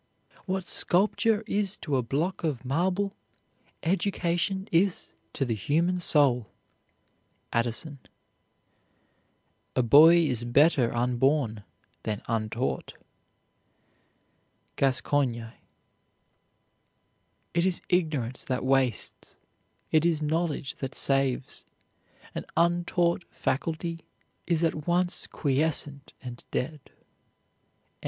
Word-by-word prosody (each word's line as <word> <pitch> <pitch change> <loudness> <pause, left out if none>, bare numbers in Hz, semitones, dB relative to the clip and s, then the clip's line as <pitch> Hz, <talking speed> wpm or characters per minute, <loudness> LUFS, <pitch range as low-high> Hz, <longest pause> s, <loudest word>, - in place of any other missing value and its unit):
What 190 -1 -2
sculpture 210 +4 +2
is 205 -2 0
to 145 -4 -3
a 130 - +2
block 150 +11 -2
of 140 -6 -2
marble, 185 +8 0 0.7
education 190 +1 0
is 180 +2 +1 0.2
to 135 - -1
the 120 - -1
human 165 - 0
soul. 135 -9 +3 1.1
ADDISON. 120 +5 -1 1.8
A 125 - +3
boy 150 +8 +8
is 130 -9 +2
better 125 0 +3
unborn 125 -2 0 0.4
than 105 -2 -4
untaught. 115 +2 -2 1.8
GASCOIGNE. 130 -3 0 2.0
It 170 - +2
is 185 -1 0
ignorance 155 -9 -1
that 130 -4 -2
wastes; 130 -3 -1 0.5
it 155 0 +4
is 170 -2 +2
knowledge 155 -3 -1
that 135 -1 -5
saves, 135 -2 0 0.7
an - - -4
untaught 175 0 +1
faculty 165 +4 -3 0.5
is 170 -1 +1
at 155 -2 -1
once 175 +1 +1
quiescent 140 -1 0
and 120 -2 -8
dead. 150 +4 -3
N. - - -28
150 Hz, 90 wpm, -27 LUFS, 130-175 Hz, 2.0 s, boy